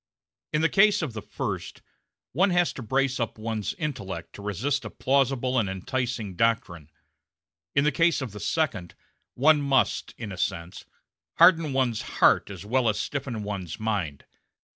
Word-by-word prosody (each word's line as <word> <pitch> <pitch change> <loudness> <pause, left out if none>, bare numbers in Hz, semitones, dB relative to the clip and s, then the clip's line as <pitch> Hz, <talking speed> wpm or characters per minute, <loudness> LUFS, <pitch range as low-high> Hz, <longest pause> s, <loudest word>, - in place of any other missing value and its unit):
In 150 - +1
the 165 - +4
case 200 0 +4
of 140 -7 -3
the 110 - -5
first, - - -5 0.5
one 190 +9 +3
has 175 -1 +2
to - - -7
brace 130 +3 0
up 115 -2 -2
one's 110 -1 -3
intellect 100 - -5
to - - -10
resist 120 +8 -1
a 110 - -6
plausible 130 -1 +1
and 105 -4 0
enticing 110 +1 -3
doctrine; 85 -8 0 0.9
in 140 - +4
the 150 - +3
case 165 +3 +2
of 130 -5 -5
the 105 - -9
second, 110 - -1 0.4
one 150 +3 +5
must, 135 -2 +1
in 110 -4 -6
a 95 - -7
sense, 90 -2 -3 0.5
harden 165 -3 +6
one's 130 -4 0 0.2
heart - - +4
as - - -8
well 120 +1 +2
as 105 -1 -1
stiffen 125 -4 -3
one's 100 -5 -5
mind. 100 -10 -2
120 Hz, 165 wpm, -26 LUFS, 105-140 Hz, 0.9 s, harden